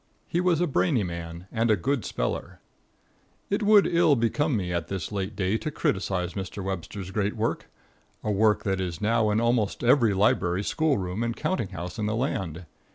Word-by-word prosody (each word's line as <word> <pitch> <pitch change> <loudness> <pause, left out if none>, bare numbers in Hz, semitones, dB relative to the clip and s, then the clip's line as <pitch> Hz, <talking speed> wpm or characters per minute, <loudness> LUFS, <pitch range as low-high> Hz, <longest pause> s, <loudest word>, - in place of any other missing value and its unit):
He 175 - 0
was 180 -3 +2
a 175 - +3
brainy 140 - +1
man 85 -1 -6
and 115 0 +1
a 110 - +5
good 135 +7 -1
speller. - - -3 0.9
It 200 +3 +1
would 210 -1 +6
ill 170 -4 +4
become 130 +3 +1
me 90 -3 -2
at 85 -2 -2
this 95 -2 -4
late 100 +1 -3
day 95 +3 0
to 155 - -3
criticise 95 - -1
Mr. 95 +1 -5
Webster's 95 0 -5
great 105 +1 -1
work 115 +1 -2 0.5
a 105 - 0
work 105 +1 +3
that 95 -2 0
is 85 -3 -3
now 110 0 +2
in 105 +1 +2
almost 115 -3 +1
every 120 -4 +4
library, 95 -2 +2
school 155 +4 +1
room 90 +3 -3
and 115 0 -1
counting 185 - -1
house 90 0 -6
in 105 - 0
the 110 - 0
land. 95 - -2
105 Hz, 190 wpm, -26 LUFS, 95-120 Hz, 0.9 s, would